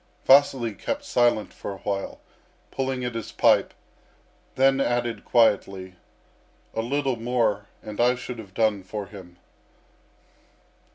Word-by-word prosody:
Vasily 135 -4 +5
kept 285 - -4
silent 120 - +1
for - - -6
a 100 - -7
while, 100 0 -4 0.5
pulling 130 -1 -2
at 120 - -3
his 115 -1 -5
pipe, - - +3 0.8
then 135 +1 +4
added 120 -2 -1
quietly: 95 -5 +2 0.8
"A 110 - -1
little 135 +1 -1
more 115 -4 0 0.2
and 105 +1 -4
I 125 +1 +4
should 125 -1 -7
have 100 -4 -11
done 110 -3 +2
for 100 +2 -6
him." 90 -4 -13
115 Hz, 125 wpm, -25 LUFS, 105-125 Hz, 0.8 s, Vasily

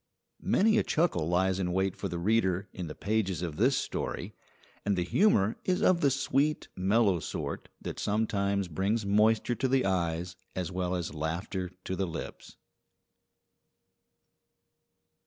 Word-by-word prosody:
Many 220 +2 +3
a - - +1
chuckle 90 - +1
lies 95 +2 +2
in 90 -2 -1
wait 95 0 +1
for 100 - -4
the 85 -1 -4
reader 95 0 +1
in 90 -2 -5
the 75 - -7
pages 100 -5 -1
of 80 -4 -4
this 125 +5 +3
story. - - -3 0.5
And 100 -1 +1
the 90 - +1
humour 110 - +3
is 185 -1 0
of 180 -2 +4
the 140 - +5
sweet, 140 +2 0
mellow 100 0 +3
sort - - -5
that - - -6
sometimes 100 -2 0
brings 100 +6 -1
moisture 110 +4 +3
to 130 +2 0
the 130 -2 +2
eyes 90 -1 -1 0.2
as 90 -2 -3
well 90 0 -1
as 85 -4 -3
laughter 90 +5 -3
to 95 - -3
the 95 0 -1
lips. 85 0 -7
95 Hz, 150 wpm, -30 LUFS, 90-115 Hz, 0.5 s, the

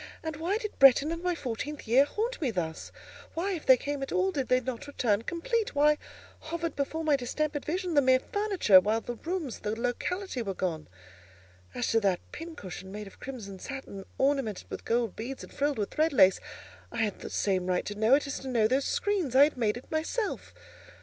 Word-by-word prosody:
And 320 -1 -3
why 350 +6 0
did 430 -2 -6
Bretton 275 +3 +7
and 335 0 -4
my 360 -1 0
fourteenth 285 0 -5
year 255 +5 +6
haunt 450 +9 -3
me 280 - +1
thus? 165 -7 -4 0.4
Why, 365 +5 -1
if 345 -5 -5
they 260 - +8
came 285 +2 -4
at 270 - -4
all, 375 +1 +2
did 275 -7 -2
they 255 - +4
not 255 +1 -5
return 225 -7 +1
complete? 415 - -2
Why 295 +1 +4 0.4
hovered 335 +1 -4
before 315 +3 -2
my 305 -2 +4
distempered 290 +3 -2
vision 360 +2 -2
the 290 - +5
mere 260 -1 +5
furniture, 395 - +4
while 215 +4 0
the 240 - -5
rooms 320 0 -4
and - - -18
the 215 +2 -2
locality 260 +6 -2
were 195 -4 -3
gone? 165 -5 -3 0.9
As 245 - -1
to 225 - +4
that 195 -4 +1
pincushion 200 - -8
made 210 +1 -6
of 195 - -14
crimson 215 -8 -7
satin, 265 -7 -7
ornamented 270 -7 0
with - - -6
gold 230 -3 0
beads 255 +5 -6
and - - -12
frilled 285 -1 0
with 205 -2 -2
thread 315 +1 +1
lace, 190 -7 +6 0.5
I 230 -1 0
had 210 -2 -2
the - - -7
same 185 -3 0
right 180 -1 0
to 205 - -4
know 220 +5 +4
it 290 - 0
as 280 - -4
to 270 - -8
know 235 -4 +3
the 260 +4 +2
screens—I 300 - +2
had 300 - +2
made 225 -3 0
it 245 - -13
myself. 325 +8 -2
270 Hz, 210 wpm, -29 LUFS, 225-320 Hz, 0.9 s, they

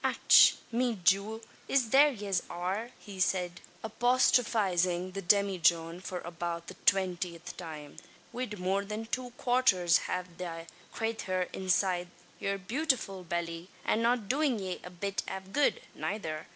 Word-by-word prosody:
"Ach! - - +6 0.2
me 235 -2 0
jewel, 200 +5 +2 0.3
it's 255 -5 +2
there 280 +5 +7
yez 200 -6 -1
are!" 190 +7 -3 0.3
said 185 -1 +1
he, 175 - -15 0.2
apostrophising 210 -7 +2
the 195 +1 -5
demijohn 175 -3 +2
for 180 -1 -5
about 170 0 -5
the 185 - -8
twentieth 180 -3 0
time, 155 -4 -9 0.4
"wid 240 -4 -4
more 190 +2 0
than 210 +2 -5
two 250 +2 -3
quarts 255 -2 +3 0.4
av 180 -2 -4
the 165 -2 -5 0.3
crayther 195 -5 -2
inside 185 -1 +1 0.3
yer 200 0 -1
bewtifull 220 -3 -1
belly, 170 0 -4 0.2
and 225 - +2
not 235 -2 +1
doin' 275 0 +1
ye 190 -3 -4
a - - -8
bit 195 +2 -3
av 190 0 -7
good, 290 - +2
nayther. 160 -7 -4
190 Hz, 140 wpm, -30 LUFS, 175-225 Hz, 0.4 s, there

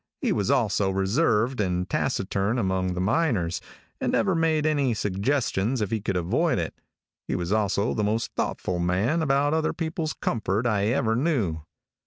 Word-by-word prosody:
He - - 0
was - - 0
also 100 -2 +2
reserved 105 +4 +1
and 90 -2 -1
taciturn 100 +6 -1
among 95 -4 0
the - - -3
miners, 105 - +1 0.4
and - - -1
never 190 - +2
made 160 -2 +1
any 140 -6 +2
suggestions 105 +3 0
if 105 -3 -2
he 110 -2 -1
could 95 -2 -1
avoid 85 -1 +1
it. - - -2 0.5
He - - -1
was 90 +1 -3
also 105 0 +1
the 105 - -1
most 110 +2 -1
thoughtful 90 -1 -2
man 95 - +1
about 145 0 +2
other 160 0 +1
people's 160 -1 -3
comfort 110 -1 -1
I 105 -3 +1
ever 115 -2 +1
knew. 115 - 0
110 Hz, 165 wpm, -26 LUFS, 95-140 Hz, 0.5 s, also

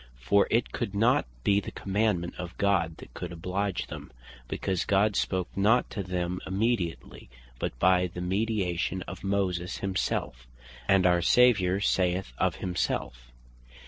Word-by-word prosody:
For 100 +12 +3
it 115 +2 +1
could 100 - -3
not 115 - +3 0.2
be 100 0 +4
the - - -6
commandement 100 -3 -1
of 90 -1 -6
God 90 -5 +1
that - - -13
could 90 - -6
oblige 90 +3 -2
them; - - -9 0.4
because 95 +6 -1
God 100 +1 +2
spake 95 -3 -1
not 110 +6 +3
to 105 - -3
them 90 -1 -2
immediately, 95 - -2 0.3
but - - -3
by 90 +5 +4
the 90 - -8
mediation 95 -2 -1
of 90 -1 -9
Moses 95 -3 -1
Himself; 95 -10 -2 0.4
And 95 -2 +4
our 90 -1 +4
Saviour 100 -2 +4
saith 90 -8 +1
of - - +1
himself, 60 -9 -3
(John - - -24 0.4
5. - - -24
95 Hz, 150 wpm, -28 LUFS, 90-100 Hz, 0.4 s, be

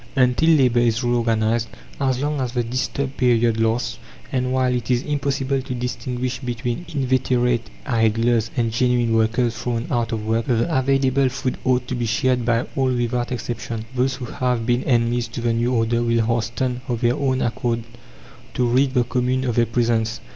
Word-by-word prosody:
Until 130 +4 +3
labour 130 -7 +4
is 120 0 +1
reorganized, 115 -1 +1 0.3
as 130 -3 +1
long 145 0 -1
as 125 -2 -3
the 120 -2 0
disturbed 130 +3 -3
period 120 -2 +2
lasts, 115 0 0 0.3
and 125 -1 0
while 130 -1 +1
it 120 -2 -3
is 125 0 +2
impossible 140 -2 -1
to 130 -1 -5
distinguish 125 +1 -3
between 120 +4 -4
inveterate 125 -3 +1 0.2
idlers 115 -1 +2
and 115 -2 +1
genuine 120 0 +1
workers 115 +1 +1
thrown 115 +1 -2
out 120 -1 0
of 110 -2 -3
work, 115 +1 0
the 125 +7 +1
available 135 0 +2
food 130 0 -3
ought 125 -1 +1
to - - -3
be 120 -2 -1
shared 125 +2 +1
by 120 0 +1
all 130 -1 +1
without 120 0 -1
exception. 115 -2 -4
Those 130 +1 +1
who 130 -2 -6
have 125 -2 -1
been 120 +1 +1
enemies 120 -1 +1
to 115 - -6
the 115 -1 +1
new 120 +2 0
order 115 -1 +1
will 115 -1 +1
hasten 120 +2 -1
of 120 -2 -2
their 120 0 +2
own 130 -2 0
accord 120 0 -1 0.7
to 125 - +2
rid 130 +3 +2
the 125 - +4
commune 125 +2 0
of 125 -3 0
their 115 0 +2
presence. 115 -1 0
120 Hz, 180 wpm, -22 LUFS, 115-130 Hz, 0.7 s, labour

